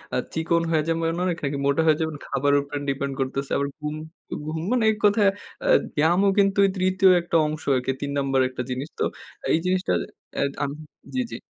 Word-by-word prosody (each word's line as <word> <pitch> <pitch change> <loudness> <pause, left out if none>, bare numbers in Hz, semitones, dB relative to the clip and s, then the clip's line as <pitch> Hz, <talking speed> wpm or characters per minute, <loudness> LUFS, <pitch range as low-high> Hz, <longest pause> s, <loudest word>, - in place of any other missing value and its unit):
আ - - +2 0.2
চিকন 165 +1 +1
হয়ে 155 -1 +2
যাবেন 165 0 0
অনেক, 175 -2 0
নাকি 140 0 -1
মোটা 140 +3 +3
হয়ে 155 -1 +5
যাবেন, 160 -1 -2
খাবারের 145 +1 +2
উপরে 145 0 -5
ডিপেন্ড 140 0 -2
করতেছে। 135 +1 -2
আবার 140 - 0
ঘুম 150 0 -4 0.5
ঘুম 155 +1 -3
মানে 250 -2 +2
এক 215 - -4
কথায় 205 0 +5 0.4
আ - - 0 0.3
ব্যায়ামও 175 +6 +3
কিন্তু 195 0 +3 0.2
৩য় 185 +1 +3
একটা 170 - -4
অংশ 155 0 -5
আরকি, 130 +1 0
৩ 140 - -2
নাম্বার 135 -1 +1
একটা 130 -1 -5
জিনিস। 130 +4 -4
তো - - +2 0.5
এই - - +4
জিনিসটা 185 +1 +1
এ - - -13
অ্যাদ 140 - +1
আম 140 - -1 0.4
জি, 260 - +1
জি। - - -4
155 Hz, 200 wpm, -24 LUFS, 140-185 Hz, 0.5 s, হয়ে